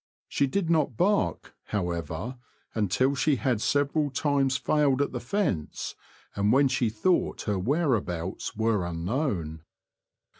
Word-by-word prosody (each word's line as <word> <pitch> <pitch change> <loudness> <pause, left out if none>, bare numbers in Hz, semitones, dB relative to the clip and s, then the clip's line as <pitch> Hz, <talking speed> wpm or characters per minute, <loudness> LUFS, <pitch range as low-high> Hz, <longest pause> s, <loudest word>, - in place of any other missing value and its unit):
She 140 - +1
did 190 +5 -1
not 155 -8 +1
bark, 205 +2 +1
however, 90 +5 -3 0.3
until 110 +6 +2
she 145 +2 +2
had 125 -4 0
several 145 +2 +1
times 135 -1 +1
failed 145 -3 +2
at 140 - +1
the 125 - -3
fence, 125 - -2 0.4
and 100 +1 +2
when 135 +2 +5
she 125 -3 +1
thought 115 +12 0
her 105 -3 -1
whereabouts 110 - -1
were 110 -3 +1
unknown. 85 - -2
130 Hz, 125 wpm, -27 LUFS, 100-145 Hz, 0.4 s, when